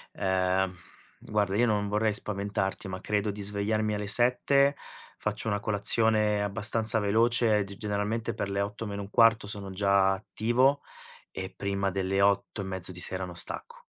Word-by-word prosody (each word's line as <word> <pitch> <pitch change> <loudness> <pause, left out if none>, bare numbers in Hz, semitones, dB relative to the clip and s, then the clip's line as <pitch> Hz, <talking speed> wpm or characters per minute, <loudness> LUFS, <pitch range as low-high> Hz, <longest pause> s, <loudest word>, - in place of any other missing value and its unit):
Ehm, 95 0 0 0.5
guarda 100 -2 -1
io 120 - +3
non 105 -2 0
vorrei 105 +1 +1
spaventarti, 100 -1 -3
ma 95 0 -6
credo 105 0 -1
di 100 0 -7
svegliarmi 105 +1 -1
alle 105 -1 -4
7, 125 +5 +4 0.4
faccio 105 +1 -3
una 105 -1 -1
colazione 105 0 +2
abbastanza 110 +2 +2
veloce, 110 +1 +3
g 100 0 -10
generalmente 105 +1 -3
per 100 - -4
le 100 0 -1
8 105 +3 -4
meno 100 0 -5
1/4 110 +1 +3
sono 100 -1 -6
già 100 0 +2
attivo, 120 +8 0 0.5
e 95 0 -6
prima 100 0 -2
delle 95 +1 -1
ore 100 - +6
8 105 - -10
e - - -6
mezzo 95 -1 -3
di 90 - -8
sera 95 +1 -1
non 90 -1 -9
stacco. - - -3
105 Hz, 165 wpm, -28 LUFS, 100-110 Hz, 0.5 s, ore